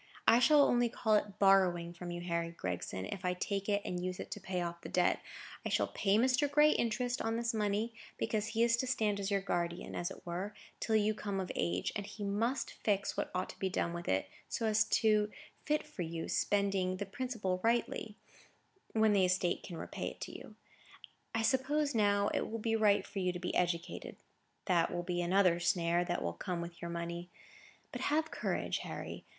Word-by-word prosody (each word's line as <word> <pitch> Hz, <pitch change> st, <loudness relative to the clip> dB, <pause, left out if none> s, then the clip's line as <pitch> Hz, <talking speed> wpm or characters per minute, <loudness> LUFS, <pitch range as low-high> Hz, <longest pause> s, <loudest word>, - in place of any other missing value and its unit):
I 230 Hz, -, +7 dB
shall 290 Hz, +3 st, +6 dB
only 240 Hz, -3 st, +3 dB
call 220 Hz, -2 st, 0 dB
it 210 Hz, -1 st, +1 dB
borrowing 180 Hz, -3 st, +4 dB
from 175 Hz, 0 st, -7 dB
you, 175 Hz, 0 st, -4 dB
Harry 170 Hz, -1 st, -1 dB
Gregson, 95 Hz, -, -4 dB
if 180 Hz, -, -6 dB
I 180 Hz, 0 st, 0 dB
take 200 Hz, +2 st, -2 dB
it 200 Hz, 0 st, +1 dB
and 180 Hz, 0 st, -3 dB
use 185 Hz, 0 st, -3 dB
it -, -, -6 dB
to -, -, -4 dB
pay 185 Hz, -1 st, -3 dB
off 170 Hz, -1 st, -3 dB
the -, -, -7 dB
debt. 180 Hz, -1 st, +2 dB, 0.4 s
I -, -, -2 dB
shall -, -, +1 dB
pay 200 Hz, +1 st, +3 dB
Mr. 260 Hz, +4 st, +3 dB
Gray 300 Hz, +1 st, +6 dB
interest 245 Hz, +1 st, 0 dB
on 225 Hz, 0 st, 0 dB
this 235 Hz, 0 st, 0 dB
money, 215 Hz, +1 st, 0 dB, 0.2 s
because 215 Hz, -1 st, -1 dB
he 225 Hz, +1 st, +1 dB
is 235 Hz, -1 st, +4 dB
to 260 Hz, -, -1 dB
stand 215 Hz, -5 st, +1 dB
as 195 Hz, 0 st, -2 dB
your 200 Hz, -1 st, +1 dB
guardian, 175 Hz, -2 st, -2 dB
as 175 Hz, -, -2 dB
it -, -, -11 dB
were, 185 Hz, +4 st, -4 dB, 0.2 s
till 220 Hz, -, 0 dB
you 215 Hz, 0 st, +3 dB
come 200 Hz, -2 st, -3 dB
of 185 Hz, -, -3 dB
age; 85 Hz, +1 st, 0 dB
and 205 Hz, -1 st, -3 dB
he 210 Hz, -, -7 dB
must 225 Hz, +6 st, -1 dB
fix 200 Hz, -2 st, +1 dB
what -, -, -2 dB
ought 185 Hz, 0 st, 0 dB
to -, -, -10 dB
be 190 Hz, -, 0 dB
done 170 Hz, -2 st, -1 dB
with 170 Hz, 0 st, -6 dB
it, 95 Hz, +1 st, +1 dB, 0.2 s
so 230 Hz, -, -1 dB
as 220 Hz, 0 st, +3 dB
to 215 Hz, -2 st, +3 dB, 0.4 s
fit 300 Hz, 0 st, +1 dB, 0.2 s
you 165 Hz, -1 st, -2 dB
for -, -, -6 dB
spending 195 Hz, -2 st, +1 dB
the 200 Hz, -, -3 dB
principal 200 Hz, -4 st, -2 dB
rightly 230 Hz, -2 st, 0 dB, 0.8 s
when 220 Hz, -1 st, +4 dB
the 195 Hz, -2 st, +5 dB
estate 180 Hz, -1 st, +1 dB
can 175 Hz, -, -7 dB
repay -, -, -4 dB
it -, -, -4 dB
you. -, -, -10 dB, 0.8 s
I 225 Hz, -, +1 dB
suppose, 280 Hz, +4 st, +2 dB
now, 205 Hz, -2 st, +3 dB
it -, -, -1 dB
will 225 Hz, -, -3 dB
be 225 Hz, 0 st, 0 dB
right 210 Hz, -2 st, +4 dB
for 200 Hz, -, -5 dB
you 180 Hz, -1 st, +1 dB
to 175 Hz, -, -5 dB
be 180 Hz, -, -3 dB
educated. 170 Hz, -1 st, -1 dB, 0.5 s
That 175 Hz, -3 st, +2 dB
will 175 Hz, 0 st, -2 dB
be 175 Hz, 0 st, -1 dB
another 180 Hz, -1 st, +3 dB
snare 170 Hz, 0 st, +2 dB
that 175 Hz, 0 st, -1 dB
will 85 Hz, -, -1 dB
come 170 Hz, -, -3 dB
with 170 Hz, 0 st, -7 dB
your 170 Hz, -, -4 dB
money. 170 Hz, +1 st, -4 dB, 0.6 s
But -, -, -5 dB
have 315 Hz, +2 st, +1 dB
courage, -, -, -1 dB
Harry. -, -, -6 dB
200 Hz, 210 wpm, -34 LUFS, 175-225 Hz, 0.8 s, I